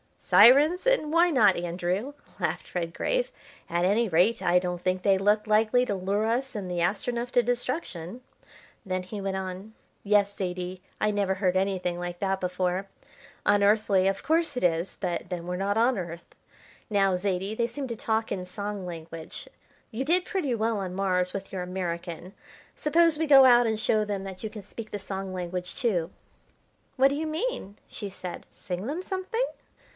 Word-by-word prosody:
"Syrens 290 Hz, -, +6 dB
and -, -, +2 dB
why 340 Hz, +2 st, +5 dB
not, 215 Hz, -, +4 dB
Andrew?" 180 Hz, +8 st, -2 dB, 0.3 s
laughed -, -, -3 dB
Redgrave. 335 Hz, -, -1 dB, 0.4 s
"At 170 Hz, 0 st, 0 dB
any 210 Hz, +5 st, +3 dB
rate, 185 Hz, +6 st, +3 dB
I 175 Hz, +1 st, +3 dB
don't 180 Hz, -1 st, -3 dB
think 185 Hz, 0 st, 0 dB
they 195 Hz, 0 st, +4 dB
look 205 Hz, +2 st, +2 dB
likely 220 Hz, +3 st, +3 dB
to 205 Hz, -, -1 dB
lure 200 Hz, +3 st, 0 dB
us 250 Hz, +3 st, -1 dB
and 190 Hz, -4 st, -4 dB
the 175 Hz, -, -2 dB
Astronef 235 Hz, +7 st, -1 dB
to 245 Hz, -, +4 dB
destruction." 245 Hz, -, -3 dB, 0.6 s
Then 185 Hz, -1 st, -2 dB
he 200 Hz, +3 st, -7 dB
went 195 Hz, -1 st, -2 dB
on: 190 Hz, +3 st, -6 dB, 0.3 s
"Yes, 205 Hz, -1 st, +3 dB
Zaidie, 180 Hz, -1 st, -4 dB, 0.2 s
I 215 Hz, -, +3 dB
never 200 Hz, -2 st, 0 dB
heard 185 Hz, -1 st, +1 dB
anything 185 Hz, -2 st, -1 dB
like 175 Hz, 0 st, -4 dB
that 195 Hz, -1 st, 0 dB
before. 180 Hz, +1 st, -1 dB, 0.6 s
Unearthly, 205 Hz, -1 st, +4 dB
of 195 Hz, 0 st, -1 dB
course 325 Hz, -2 st, +1 dB
it 250 Hz, -, -2 dB
is, 170 Hz, +1 st, 0 dB
but 180 Hz, -1 st, -3 dB
then 175 Hz, -2 st, -4 dB
we're 180 Hz, 0 st, -3 dB
not 200 Hz, +2 st, 0 dB
on 240 Hz, +2 st, +3 dB
Earth. 170 Hz, -2 st, -7 dB, 0.6 s
Now, 195 Hz, -3 st, +3 dB
Zaidie, 190 Hz, +1 st, -1 dB
they 235 Hz, +1 st, +1 dB
seem 265 Hz, +3 st, -5 dB
to 235 Hz, -, -3 dB
talk 220 Hz, 0 st, -1 dB
in 185 Hz, -2 st, -3 dB
song 200 Hz, +1 st, -5 dB
language. 165 Hz, -2 st, -8 dB, 0.4 s
You 250 Hz, +5 st, -3 dB
did 355 Hz, +4 st, +2 dB
pretty 345 Hz, -, -1 dB
well 225 Hz, -1 st, 0 dB
on 185 Hz, -2 st, -4 dB
Mars 185 Hz, -2 st, 0 dB
with 195 Hz, -1 st, -6 dB
your 190 Hz, -, -3 dB
American, 180 Hz, -1 st, -5 dB, 0.4 s
suppose 330 Hz, +1 st, +3 dB
we 320 Hz, -, +1 dB
go 275 Hz, -2 st, +9 dB
out 240 Hz, -2 st, +6 dB
and 220 Hz, -1 st, 0 dB
show 215 Hz, -1 st, +2 dB
them 200 Hz, -2 st, -3 dB
that 190 Hz, -1 st, -8 dB
you 220 Hz, -, -3 dB
can 210 Hz, -1 st, -9 dB
speak 220 Hz, +2 st, -9 dB
the 205 Hz, -, -3 dB
song 190 Hz, -1 st, -5 dB
language, 180 Hz, 0 st, -4 dB
too." 180 Hz, -9 st, 0 dB, 0.9 s
"What 270 Hz, 0 st, +5 dB
do 280 Hz, -, -2 dB
you 315 Hz, +2 st, -2 dB
mean?" 310 Hz, -, -3 dB
she 205 Hz, -, -6 dB
said; 185 Hz, -2 st, -8 dB
"sing 180 Hz, +4 st, -6 dB
them 310 Hz, +6 st, -3 dB
something?" 380 Hz, +6 st, -2 dB
200 Hz, 180 wpm, -27 LUFS, 180-235 Hz, 0.9 s, go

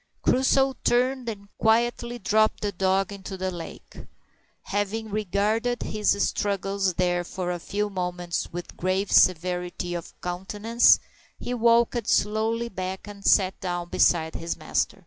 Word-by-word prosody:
Crusoe 265 Hz, +1 st, +3 dB
turned 250 Hz, 0 st, +1 dB
and 200 Hz, -2 st, -7 dB
quietly 235 Hz, +2 st, +1 dB
dropped 215 Hz, +1 st, +2 dB
the 205 Hz, -, -1 dB
dog 195 Hz, +1 st, +1 dB
into 195 Hz, -1 st, -7 dB
the 185 Hz, 0 st, -2 dB
lake. 170 Hz, -2 st, -10 dB, 0.6 s
Having 205 Hz, +2 st, -2 dB
regarded 215 Hz, +4 st, 0 dB
his 210 Hz, -1 st, 0 dB
struggles 195 Hz, -2 st, -1 dB
there 175 Hz, -1 st, +1 dB
for 180 Hz, 0 st, -4 dB
a 175 Hz, -, -3 dB
few 205 Hz, +4 st, -2 dB
moments 180 Hz, -3 st, -3 dB
with 175 Hz, +1 st, -7 dB
grave 185 Hz, +2 st, -1 dB
severity 180 Hz, 0 st, +2 dB
of 170 Hz, -1 st, -7 dB
countenance, 205 Hz, +6 st, +3 dB, 0.4 s
he 245 Hz, -, -4 dB
walked 235 Hz, -1 st, +3 dB
slowly 220 Hz, +3 st, +1 dB
back 190 Hz, -2 st, -5 dB
and 200 Hz, -1 st, -10 dB
sat 190 Hz, -2 st, +3 dB
down 175 Hz, -2 st, -3 dB
beside 160 Hz, -2 st, +2 dB
his 165 Hz, 0 st, -4 dB
master. 155 Hz, +5 st, -1 dB
200 Hz, 135 wpm, -25 LUFS, 180-220 Hz, 0.6 s, Crusoe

